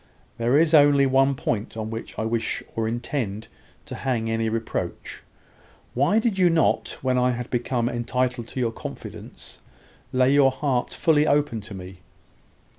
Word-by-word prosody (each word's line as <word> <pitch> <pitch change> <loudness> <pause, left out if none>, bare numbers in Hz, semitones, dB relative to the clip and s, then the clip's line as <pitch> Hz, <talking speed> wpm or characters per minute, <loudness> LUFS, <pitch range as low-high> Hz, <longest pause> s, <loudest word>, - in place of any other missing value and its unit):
There 120 +4 +3
is 160 +1 +3
only 145 -2 +6
one 135 +1 +3
point 115 -3 -3
on 110 0 -4
which 115 0 -7
I - - -1
wish 115 0 -2
or 115 -1 -1
intend 115 -2 -3 0.4
to - - -8
hang 115 -4 -2
any 115 0 0
reproach. 115 0 -4 0.7
Why 145 - +2
did 225 -3 +1
you 180 -1 +5
not, 165 -1 +1
when 130 -1 +2
I 125 0 +2
had 120 0 -6
become 120 -1 0
entitled 120 0 -1
to 130 - -6
your 120 -2 0
confidence, - - -10 0.5
lay 130 +1 +3
your 140 -2 +6
heart 130 -2 -1
fully 155 -2 +2
open 145 -6 +1
to 105 0 -10
me? 90 0 -10
125 Hz, 160 wpm, -24 LUFS, 115-140 Hz, 0.7 s, only